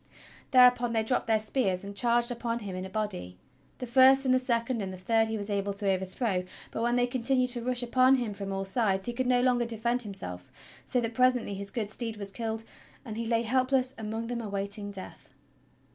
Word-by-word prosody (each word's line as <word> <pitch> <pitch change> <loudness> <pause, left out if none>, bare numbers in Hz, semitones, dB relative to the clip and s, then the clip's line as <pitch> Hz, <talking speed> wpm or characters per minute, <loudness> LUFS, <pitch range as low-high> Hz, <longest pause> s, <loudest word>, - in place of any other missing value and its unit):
Thereupon 250 -2 +5
they 225 -1 +2
dropped 245 +1 0
their 220 -1 +4
spears 215 -4 -1
and 200 0 -8
charged 240 +3 +2
upon 235 -1 -2
him 200 -5 -6
in 185 0 -4
a - - -7
body. 190 - -4 0.4
The 250 - -5
first 265 +2 +6
and 255 - +4
the 255 - +4
second 235 -2 0
and 190 -1 -4
the 185 - -8
third 225 +4 +2
he 220 0 -3
was 205 -1 -5
able 200 -1 -1
to 200 0 -4
over 190 0 -1
throw; 190 -1 -1 0.3
but - - -4
when 240 +1 +1
they 245 0 +3
continued 255 +1 +1
to 240 -1 -3
rush 250 +1 0
upon 255 +2 +4
him 240 -5 -2
from 200 -1 -6
all 195 0 -2
sides, 195 -2 0
he 240 - -2
could 255 +1 -1
no 250 -1 +3
longer 245 -2 +2
defend 235 +2 -1
himself, 130 - -7 0.3
so 250 - 0
that 230 0 -3
presently 250 -3 +2
his 200 0 -5
good 215 -1 -3
steed 225 -1 -2
was 200 -1 -5
killed, 225 +1 -4 0.4
and 220 -3 -6
he 230 0 -3
lay 230 0 +1
helpless 255 +2 +1
among 220 +1 -4
them 240 0 -3
awaiting 200 -1 -3
death. 195 -2 -10
230 Hz, 220 wpm, -29 LUFS, 200-245 Hz, 0.4 s, first